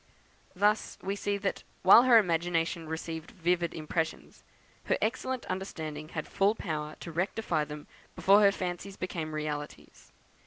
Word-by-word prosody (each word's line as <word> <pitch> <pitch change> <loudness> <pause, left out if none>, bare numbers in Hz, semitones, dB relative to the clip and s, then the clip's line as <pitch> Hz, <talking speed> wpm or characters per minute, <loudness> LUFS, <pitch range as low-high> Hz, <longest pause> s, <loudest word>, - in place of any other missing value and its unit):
Thus 210 +3 +1
we 195 +1 -1
see 205 0 -1
that, 200 -1 -2 0.2
while 195 +5 +9
her 245 -2 +8
imagination 170 -3 +1
received 160 0 -5
vivid 175 -1 0
impressions, 160 0 -3 0.4
her - - +1
excellent 255 +2 -2
understanding 155 -5 -5
had 155 -3 -5
full 200 +3 +2
power 155 -6 -4
to 170 - -6
rectify 175 -2 -1
them 150 0 -8 0.3
before 200 +2 +5
her 200 -1 +6
fancies 185 +1 -5
became 160 -4 -4
realities. 150 -1 -6
175 Hz, 140 wpm, -30 LUFS, 155-200 Hz, 0.4 s, while